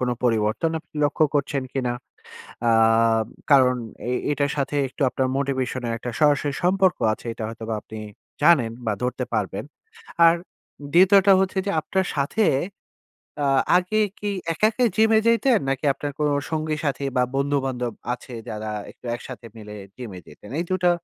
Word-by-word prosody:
কোন 125 - 0 0.2
পরিবর্তন 110 +6 +1
আপনি - - -45
লক্ষ্য 155 +2 +2
করছেন 140 -1 0
কিনা? 125 -3 -1 0.8
আ - - +5 0.8
কারণ 130 -3 +6 0.3
এ - - 0 0.2
এটার 145 0 0
সাথে 140 +1 -1
একটু 135 +3 -5
আপনার 130 -1 0
মোটিভেশন 130 -2 -2
এর 115 - -1
একটা 125 - -5
সরাসরি 145 -1 +3
সম্পর্ক 185 -1 +3
আছে। 120 - -7
এটা 115 - -6
হয়তোবা 115 -1 -5
আপনি 110 - -9 0.4
জানেন 150 -8 +5 0.2
বা 105 - +1
ধরতে 125 +1 -1
পারবেন। 100 0 -2 0.6
আর 165 - +6 0.6
২য় 190 +3 +7
টা 200 - +8
হচ্ছে 190 0 0
যে - - +1
আপনার 190 +3 -1
সাথে 145 +10 +1 1.0
আ - - +2 0.3
আগে 185 +4 +1 0.2
কি 205 -1 -2 0.2
একা, 190 +7 +2
একাই 245 +1 +2
জিমে 220 0 +5
যাইতেন 230 +1 +4
নাকি 135 +2 -1
আপনার 145 +1 -5
কোন 150 - +2 0.2
সঙ্গী-সাথী 155 -3 -2
বা 125 - +4
বন্ধু-বান্ধব 135 -4 -1 0.2
আছে 125 0 -11
যারা 110 0 -4 0.2
একটু - - -15
একসাথে 125 -1 -10
মিলে 105 -1 -9 0.2
জিমে 110 -8 -8
যেতেন? 105 +7 -14
এই - - -1
২ 185 0 0
টা 175 - +6
140 Hz, 160 wpm, -23 LUFS, 125-170 Hz, 1.0 s, টা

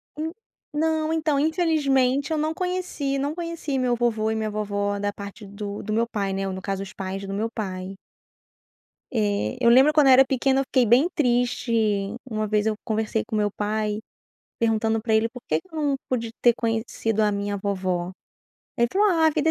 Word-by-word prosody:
En 315 +2 -3 0.4
não, 315 0 0
então 310 -3 +1
infelizmente 285 -4 +2
eu 315 - +1
não 310 +1 0
conheci, 360 -6 -2
não 285 +2 -1
conheci 335 -5 -3
meu 250 -1 +1
vovô 225 -2 0
e 220 - 0
minha 220 -1 -2
vovó 205 -1 -2
da 205 0 -1
parte 200 +1 -9
do 205 0 -6
do 215 - -5
meu 230 +2 +2
pai, 200 -4 -2
né, 195 0 -2
ou 190 - -3
no 190 - -6
caso 195 0 -3
os 195 - -10
pais 195 0 -5
do 195 - -5
meu 220 +3 -1
pai. 190 -3 -5 1.1
Eh, 210 -1 0
eu 235 - +5
lembro 265 +5 +6
quando 300 -3 +5
eu 265 - +8
era 265 +1 +7
pequena 265 +1 +1
eu 270 - 0
fiquei 255 -1 +2
bem 245 +8 +5
triste, 245 -3 +1 0.6
uma 215 -1 -1
vez 210 0 +1
eu 220 - +1
conversei 220 0 -1
com 220 - -3
meu 210 -1 +2
pai 210 +1 -2 0.6
perguntando 225 -1 +1
pra 225 -1 +1
ele 220 +1 +3
por 250 +1 -11
que - - +1
que 365 - -27
eu - - -5
não 285 -2 +1
pude 230 -3 -1
ter 240 -1 +5
conhecido 225 -1 -1
a 210 -1 +2
minha 200 0 -2
vovó, 185 -3 -2 0.7
ele 235 0 +3
falou: 410 +7 +3
"Ah, 325 -3 +3
a - - +5
vida 310 +1 +1
230 Hz, 205 wpm, -24 LUFS, 205-275 Hz, 1.1 s, eu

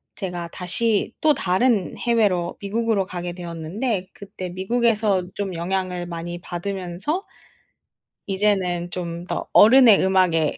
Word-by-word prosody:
제가 175 -3 -5
다시 205 +6 0
또 310 -1 +5
다른 190 - +1
해외로 205 -7 +1
미국으로 210 -1 0
가게 175 -2 -5
되었는데 180 +4 -4
그때 190 -2 -8
미국에서 210 0 +1
좀 195 -2 -4
영향을 180 0 -2
많이 175 0 -6
받으면서 190 - -4 1.0
이제는 190 -3 0
좀 170 -1 -5
더 - - -4
어른의 230 -1 +7
음악에 180 -5 +2
185 Hz, 265 characters per minute, -22 LUFS, 175-210 Hz, 1.0 s, 어른의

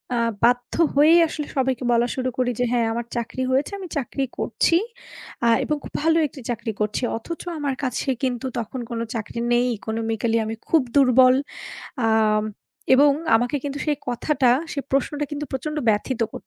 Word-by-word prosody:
আ - - 0 0.3
বাধ্য 245 +1 +2 0.2
হয়েই 305 +4 +6
আসলে 300 -2 -5
সবাইকে 260 -1 0
বলা 235 0 +3
শুরু 255 -1 -1
করি 250 -1 +1
যে 245 - +2
"হ্যাঁ, 240 -2 +2
আমার 235 +1 -3
চাকরি 235 +2 -3
হয়েছে, 270 +2 +1
আমি 370 - -6
চাকরি 275 +1 -2
করছি। 330 - +1 0.7
আ - - +4 0.2
এবং 300 - 0
খুব - - -10
ভালো 325 0 +4
একটি 275 0 -12
চাকরি 230 -1 -2
করছি।" 210 +3 -1
অথচ 330 +9 -7 0.2
আমার 280 -2 -1
কাছে 255 +1 -2 0.2
কিন্তু 250 -1 -1
তখন 235 +3 -5
কোনো 230 -1 -3
চাকরি 225 +1 -4
নেই, 240 +1 +3
economically 225 +1 -1
আমি 220 +1 -4
খুব 325 - +5
দুর্বল। 255 -2 +6 0.7
আম 215 -1 +3 0.5
এবং 285 +2 +6 0.3
আমাকে 245 +5 0
কিন্তু 285 0 -3
সেই 295 - +1
কথাটা, 250 +1 +1 0.2
সেই 280 - -3
প্রশ্নটা 285 +2 0
কিন্তু 295 0 -4
প্রচন্ড 300 +4 -3
ব্যথিত 220 +4 0
করত। - - -9
255 Hz, 170 wpm, -23 LUFS, 230-285 Hz, 0.7 s, হয়েই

